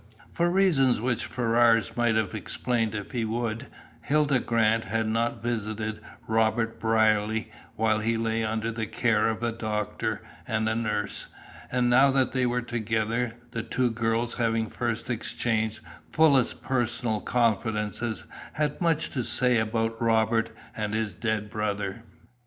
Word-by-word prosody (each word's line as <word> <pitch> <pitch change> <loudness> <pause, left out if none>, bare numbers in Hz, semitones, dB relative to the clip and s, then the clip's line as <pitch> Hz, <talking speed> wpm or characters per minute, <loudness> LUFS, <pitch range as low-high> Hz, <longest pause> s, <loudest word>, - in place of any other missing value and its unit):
For 170 +1 +2
reasons 170 - +3
which 120 0 -1
Ferrars 115 -3 +3
might 120 -2 +2
have 110 -4 0
explained 115 -3 -1
if 105 -2 -5
he 120 -3 -1
would, 115 +2 -2 0.3
Hilda 145 -2 +2
Grant 115 -1 +2
had 110 -1 -1
not 115 0 -1
visited 110 -2 -3 0.2
Robert 110 +1 +1
Brierly 110 0 +2 0.2
while 110 -1 +2
he 115 +1 0
lay 115 0 0
under 110 +1 -1
the 110 -1 -3
care 110 0 +2
of 115 +1 -2
doctor 105 -2 -2 0.2
and 110 0 0
nurse, 110 -2 -1 0.4
and 125 -1 +2
now 130 +3 +6
that 135 -1 +2
they 130 -2 +1
were 120 0 0
together, 115 0 -1 0.2
the 115 - -3
two 125 +2 0
girls, 115 +1 0
having 115 -2 0
first 120 -2 -2
exchanged 110 -1 -1 0.3
fullest 140 -6 +3
personal 120 -3 -1
confidences, 110 -1 0 0.3
had 150 +1 -1
much 165 -1 +1
to 130 - -1
say 125 0 +3
about 115 +1 -1
Robert 115 0 +2 0.3
and 105 -1 -2
his 110 -3 -1
dead 110 +2 -2
brother. 105 -1 -2
115 Hz, 140 wpm, -27 LUFS, 110-120 Hz, 0.4 s, now